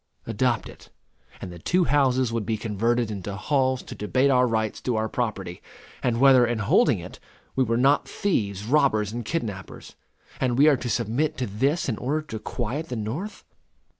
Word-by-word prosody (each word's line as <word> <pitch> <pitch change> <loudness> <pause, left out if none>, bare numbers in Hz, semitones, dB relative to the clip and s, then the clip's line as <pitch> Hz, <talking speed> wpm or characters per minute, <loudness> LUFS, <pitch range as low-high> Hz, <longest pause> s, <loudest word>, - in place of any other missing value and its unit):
Adopt 115 +1 0
it, - - -14 0.5
and 90 - -6
the 85 - -10
two 180 - +2
houses 130 -6 +2
would 115 -2 -1
be 110 +2 -1
converted 115 +2 0
into 100 -1 -5
halls 130 +3 0
to - - -9
debate 130 +6 +1
our 125 -1 +4
rights 110 -2 -1
to 125 - -1
our 110 0 0
property, 105 -7 -3 0.4
and 120 -1 0
whether, 130 -2 +7
in 120 -1 0
holding 105 -1 +3
it, - - -10 0.4
we 130 - +3
were 115 -1 0
not 135 +4 +3
thieves, 105 - -1
robbers, 115 -6 +2
and 120 0 -5
kidnappers; 105 - -5 0.4
and 125 -2 0
we 145 +3 +6
are 150 - +6
to 125 - -4
submit 120 +8 0
to 130 - -1
this 135 - 0
in 115 -5 -2
order 150 +5 -1
to 110 -8 -6
quiet 130 +8 -4
the 125 - -3
North! 125 - -5
120 Hz, 185 wpm, -25 LUFS, 110-135 Hz, 0.5 s, whether